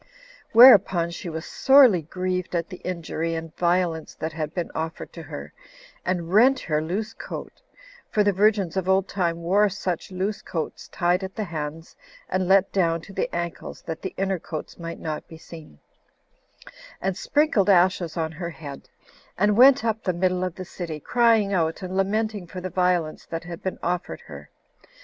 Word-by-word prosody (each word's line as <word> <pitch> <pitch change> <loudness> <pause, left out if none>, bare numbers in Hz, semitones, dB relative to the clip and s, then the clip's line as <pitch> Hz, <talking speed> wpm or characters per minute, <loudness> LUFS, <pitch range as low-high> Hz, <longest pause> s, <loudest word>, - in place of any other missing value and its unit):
Whereupon 200 -8 +7
she 170 - -6
was 160 0 -5
sorely 265 -10 +5
grieved 180 +3 -3
at 170 +1 -1
the 180 - -8
injury 165 -2 -3
and 165 -1 -6
violence 170 -2 0
that 160 0 -4
had 155 -1 -3
been 175 0 -4
offered 160 0 -5
to 170 - -8
her, 150 -1 -8 0.5
and 175 -1 -2
rent 255 +5 +6
her 155 -2 0
loose 195 +7 -3
coat, - - -8 0.5
[for 210 - +2
the 205 - +3
virgins 200 -3 +2
of 190 -1 -1
old 190 0 +3
time 170 -3 -2
wore 200 +4 +3
such 185 -3 -4
loose 195 +2 -2
coats 160 -3 -5
tied 175 +2 0
at 190 0 -6
the 220 - -2
hands, 160 -2 -6 0.3
and 185 -1 0
let 195 0 +4
down 170 -4 +1
to 195 - -13
the - - -1
ankles, 170 0 -5
that 160 -1 -6
the 190 - -5
inner 195 -1 0
coats 155 +1 -7
might 170 0 -6
not 155 -1 -5
be 160 - -11
seen,] 160 - -12 1.2
and 190 0 -1
sprinkled 290 - +2
ashes 180 -3 +3
on 160 -1 -1
her 170 +1 -5
head; 145 -4 -10 0.5
and 210 +2 +3
went 255 0 +7
up 220 -1 0
the 185 - 0
middle 180 +1 0
of 185 -2 -3
the 185 - -7
city, 170 -4 -6
crying 225 - +3
out 165 0 0
and 185 0 -5
lamenting 205 0 -1
for 185 - -7
the 185 0 -5
violence 180 -3 0
that 165 0 -5
had 175 +1 -8
been 190 - -3
offered 180 +1 -2
her. - - -11
180 Hz, 180 wpm, -24 LUFS, 165-195 Hz, 1.2 s, Whereupon